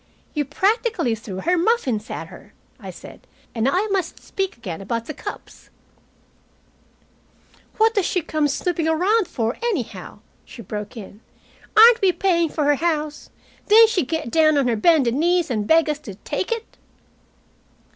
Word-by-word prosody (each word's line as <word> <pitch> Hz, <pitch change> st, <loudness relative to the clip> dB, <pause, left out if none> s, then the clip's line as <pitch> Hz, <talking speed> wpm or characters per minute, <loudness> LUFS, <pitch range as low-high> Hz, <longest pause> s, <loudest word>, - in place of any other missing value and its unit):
"You 295 Hz, -2 st, -1 dB
practically 405 Hz, -, 0 dB
threw 205 Hz, -4 st, -7 dB
her 355 Hz, +1 st, +1 dB
muffins 275 Hz, -, 0 dB
at -, -, -6 dB
her," -, -, -15 dB, 0.3 s
I -, -, -9 dB
said. -, -, -12 dB, 0.3 s
"And 230 Hz, +2 st, +1 dB
I 370 Hz, +8 st, +1 dB
must 375 Hz, -4 st, -2 dB
speak 385 Hz, -7 st, -4 dB
again 195 Hz, -7 st, -7 dB
about 230 Hz, +4 st, -3 dB
the 310 Hz, -, -6 dB
cups -, -, -10 dB, 1.0 s
" -, -, -34 dB
"What 445 Hz, +1 st, +3 dB
does 405 Hz, -5 st, +1 dB
she 360 Hz, -, 0 dB
come 310 Hz, -1 st, 0 dB
snooping 325 Hz, +3 st, -1 dB
around 365 Hz, +6 st, +2 dB
for, 235 Hz, -7 st, -2 dB
anyhow?" 245 Hz, -, -4 dB, 0.2 s
she 230 Hz, -, -12 dB
broke 210 Hz, +4 st, -7 dB
in. 210 Hz, 0 st, -11 dB, 0.6 s
"Aren't 460 Hz, +1 st, +8 dB
we 385 Hz, -2 st, +4 dB
paying 340 Hz, -3 st, +1 dB
for 300 Hz, -, -2 dB
her 290 Hz, 0 st, +3 dB
house? 310 Hz, -2 st, -2 dB, 0.4 s
Didn't 445 Hz, +1 st, +7 dB
she 375 Hz, -6 st, +1 dB
get 300 Hz, -2 st, -4 dB
down 310 Hz, -2 st, +4 dB
on 275 Hz, -3 st, +2 dB
her 235 Hz, -, +1 dB
bended 260 Hz, 0 st, +3 dB
knees 340 Hz, +2 st, +1 dB
and 210 Hz, -3 st, -2 dB
beg 325 Hz, 0 st, +4 dB
us 300 Hz, -1 st, -2 dB
to 205 Hz, -10 st, -10 dB
take 290 Hz, -, -4 dB
it?" 460 Hz, -1 st, -5 dB
310 Hz, 165 wpm, -21 LUFS, 235-370 Hz, 1.0 s, Aren't